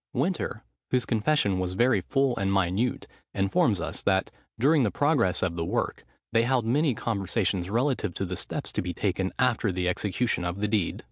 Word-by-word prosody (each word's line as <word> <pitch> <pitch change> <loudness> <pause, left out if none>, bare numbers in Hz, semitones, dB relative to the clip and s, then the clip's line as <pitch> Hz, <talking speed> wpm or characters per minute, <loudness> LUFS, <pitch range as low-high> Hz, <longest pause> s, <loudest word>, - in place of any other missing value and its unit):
Winter, 135 - -1 0.3
whose 125 -1 +1
confession 110 -4 +1
was 90 0 -2
very 125 +5 +3
full 135 -3 +1
and 95 0 0
minute, 95 +5 0 0.3
informs 95 +1 +2
us 85 - -4
that, 95 -1 +1 0.3
during 145 +5 +4
the 115 - +2
progress 140 - +1
of 90 -2 -1
the 85 - -2
work, - - -2 0.3
they 115 - +5
held 120 0 +1
many 135 +3 +2
conversations 100 -4 -1
relative 120 - 0
to 95 - -2
the 90 0 -4
steps - - -4
to - - -1
be - - -4
taken - - -1
after - - +2
the 90 0 -1
execution 100 +3 0
of 90 +2 -3
the 105 - 0
deed. 105 -5 0
105 Hz, 185 wpm, -27 LUFS, 95-125 Hz, 0.3 s, they